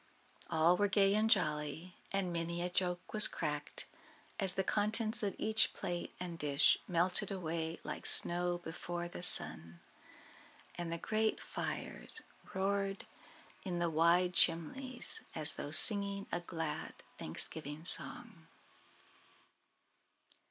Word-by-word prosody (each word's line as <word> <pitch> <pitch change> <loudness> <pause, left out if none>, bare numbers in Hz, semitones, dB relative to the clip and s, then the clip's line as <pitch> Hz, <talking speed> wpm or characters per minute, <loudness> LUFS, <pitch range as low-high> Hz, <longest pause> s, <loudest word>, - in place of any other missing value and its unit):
All 165 +3 +2
were 205 - +1
gay 195 0 +1
and 215 +1 0
jolly, 160 -3 -2 0.2
and 195 -3 -3
many 170 +1 -5
a 180 - -5
joke 180 0 -4
was 215 -1 +10
cracked - - -5 0.5
as 190 -3 +4
the 190 - -1
contents 215 +3 -1
of 200 -3 -3
each 220 0 -1
plate 175 -3 -6
and 175 -2 -8
dish 140 -1 +1
melted 180 +3 -1
away 165 -3 -5
like - - -6
snow 175 0 +3
before 175 +1 -7
the 175 - -10
sun; 85 - +1 0.9
and 175 -1 -7
the 170 - -4
great 220 +4 -2
fires - - +3 0.3
roared 195 0 -3 0.6
in 180 -3 -5
the 170 -1 -2
wide 170 +3 +1
chimneys 240 - -2
as 155 -1 +1
though - - -7
singing 200 +3 +7
a 175 - -3
glad 160 -3 -7 0.2
Thanksgiving 150 - -3
song. 210 -3 -1
175 Hz, 125 wpm, -32 LUFS, 165-200 Hz, 0.9 s, was